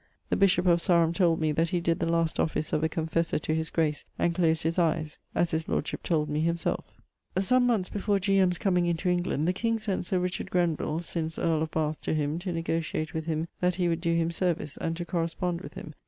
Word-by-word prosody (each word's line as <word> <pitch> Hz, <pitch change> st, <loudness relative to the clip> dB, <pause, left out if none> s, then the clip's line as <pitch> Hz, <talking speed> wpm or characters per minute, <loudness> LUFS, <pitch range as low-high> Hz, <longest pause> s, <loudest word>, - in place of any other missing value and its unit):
The -, -, +4 dB
bishop 190 Hz, -2 st, +3 dB
of 170 Hz, -1 st, +4 dB
Sarum 170 Hz, -1 st, +3 dB
told 170 Hz, -3 st, +3 dB
me 155 Hz, -1 st, +1 dB
that 160 Hz, +2 st, +1 dB
he 175 Hz, -, 0 dB
did 170 Hz, +1 st, 0 dB
the 165 Hz, -, 0 dB
last 165 Hz, -1 st, +1 dB
office 155 Hz, -1 st, -1 dB
of 155 Hz, -, +1 dB
a 160 Hz, -, +2 dB
confessor 160 Hz, +1 st, 0 dB
to 155 Hz, -, -2 dB
his 160 Hz, 0 st, -1 dB
grace; 155 Hz, -3 st, 0 dB
and 170 Hz, -, +1 dB
closed 165 Hz, -2 st, +2 dB
his 165 Hz, +3 st, 0 dB
eies, 160 Hz, -2 st, 0 dB, 0.2 s
as 170 Hz, -, +2 dB
his 160 Hz, 0 st, -2 dB
lordship -, -, -2 dB
told 155 Hz, -3 st, 0 dB
me 150 Hz, 0 st, -1 dB
himselfe. 170 Hz, 0 st, -2 dB, 0.4 s
Some 245 Hz, +6 st, +3 dB
moneths 215 Hz, -7 st, +1 dB
before 205 Hz, 0 st, +1 dB
G. 195 Hz, 0 st, +2 dB
M.'s 180 Hz, -2 st, +3 dB
comeing 180 Hz, -3 st, +1 dB
into 170 Hz, +2 st, 0 dB
England, 175 Hz, -3 st, 0 dB
the 180 Hz, -, +2 dB
king 230 Hz, +4 st, 0 dB
sent 200 Hz, -5 st, -2 dB
Sir 185 Hz, -, +1 dB
Richard 180 Hz, 0 st, -2 dB
Grenvill 170 Hz, -2 st, 0 dB
(since 165 Hz, -1 st, -3 dB
earl 160 Hz, -2 st, +1 dB
of 160 Hz, -, -1 dB
Bath) 155 Hz, -1 st, -1 dB
to -, -, -1 dB
him 150 Hz, +1 st, -1 dB
to 180 Hz, +1 st, -4 dB
negotiate 165 Hz, -2 st, -2 dB
with 160 Hz, -1 st, -3 dB
him 160 Hz, 0 st, -1 dB
that 180 Hz, 0 st, +1 dB
he 180 Hz, -1 st, +1 dB
would 165 Hz, 0 st, 0 dB
doe 170 Hz, -1 st, +1 dB
him 165 Hz, 0 st, +1 dB
service, 165 Hz, -4 st, -1 dB
and 165 Hz, 0 st, -3 dB
to 175 Hz, -, -4 dB
correspond 170 Hz, +1 st, -2 dB
with -, -, -10 dB
him. 155 Hz, -, -8 dB
170 Hz, 235 wpm, -28 LUFS, 160-180 Hz, 0.4 s, The